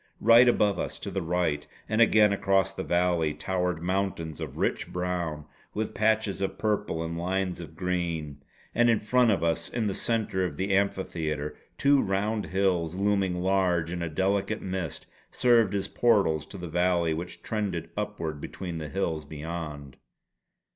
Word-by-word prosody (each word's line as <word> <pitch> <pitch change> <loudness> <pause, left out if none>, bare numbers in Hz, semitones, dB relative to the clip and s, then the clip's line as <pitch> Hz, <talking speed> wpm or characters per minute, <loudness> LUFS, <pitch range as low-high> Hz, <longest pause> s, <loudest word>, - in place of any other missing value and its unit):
Right 120 +2 +7
above 100 -6 +2
us - - -3
to - - -6
the 95 - -2
right, 85 -3 -1 0.2
and 110 +2 +1
again 105 -2 +6
across 95 -1 +2
the - - -4
valley, 85 -3 +1
towered 90 -3 -1
mountains 90 -4 -2
of - - -6
rich - - -1
brown 90 -4 -2 0.3
with 110 +1 -2
patches 110 -2 +1
of 95 0 -2
purple 105 -6 -1
and 85 0 -4
lines 90 +1 -1
of 85 -4 -9
green; 85 -6 -2 0.3
and 120 0 +4
in 115 - +4
front 125 +3 +3
of 95 -6 +2
us 85 0 0
in 120 -2 -2
the 100 - 0
centre 110 -5 0
of 80 -5 -3
the 95 +1 +1
amphitheatre, 80 -6 -1 0.2
two 140 0 +4
round 105 +3 -1
hills, 90 -3 0
looming 95 -2 +1
large 90 -3 +2
in 90 0 -3
a 85 - -2
delicate 100 +5 0
mist, 90 -5 -4 0.2
served 115 -5 +3
as 100 0 -1
portals 100 -12 +2
to 100 - -9
the 90 -1 -6
valley 85 -1 +2
which 85 +3 -6
trended 95 -7 -3
upward 85 -8 -4
between 85 -3 -5
the 75 -1 -5
hills 80 -5 -2
beyond. 75 -2 -6
90 Hz, 165 wpm, -28 LUFS, 85-100 Hz, 0.3 s, Right